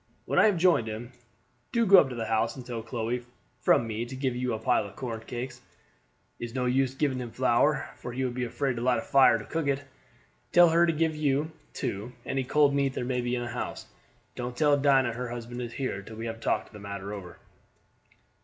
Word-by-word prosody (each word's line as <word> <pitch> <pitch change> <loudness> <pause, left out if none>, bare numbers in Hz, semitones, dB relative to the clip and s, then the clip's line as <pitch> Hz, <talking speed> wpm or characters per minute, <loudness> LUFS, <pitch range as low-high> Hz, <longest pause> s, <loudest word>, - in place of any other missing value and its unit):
When - - +1
I - - +7
have 205 -4 +2
joined 165 -9 +3
him, 110 +3 -6 0.6
do 235 - +1
you - - +4
go 195 -2 +9
up 135 - +3
to 125 - -6
the 115 -1 -3
house 110 +1 0
and 130 -3 -9
tell 120 -2 -4
Chloe 120 +1 -3 0.4
from 120 - +3
me 110 0 -3
to 130 +2 -8
give 130 -2 -1
you 125 0 -1
a 110 - -1
pile 105 - +1
of 100 - -14
corn 115 -4 -4
cake 125 +3 -5 0.9
it's 120 +1 -6
no 125 -1 0
use 130 +1 +1
giving 135 -2 0
him 125 -1 -5
flour, - - +2
for 120 - -7
he 130 +2 -2
would 125 - -2
be 125 0 -2
afraid 125 +1 -2
to - - -3
light 125 0 +3
a - - -1
fire 135 -4 +5
to 105 - -8
cook 165 -3 -2
it. 140 0 0 0.7
Tell 175 -1 +8
her 170 +1 +4
to - - +3
give 160 0 0
you, 150 +1 0 0.2
too, 105 +6 -4
any 135 0 -1
cold 145 +2 +3
meat 140 -1 +1
there - - -2
may 125 0 0
be 120 0 -1
in 120 - -2
the 120 - -4
house. 125 +1 -5 0.5
Don't 125 0 -5
tell 145 0 +4
Dinah 135 -4 +3
her 125 +1 -4
husband 120 +1 -6
is 120 -1 -5
here 130 -7 -3
till 110 +2 -11
we 115 +1 -5
have 115 0 -5
talked 115 - -1
the 105 - -9
matter 100 0 -6
over." 95 -4 -8
125 Hz, 235 wpm, -28 LUFS, 115-140 Hz, 0.9 s, go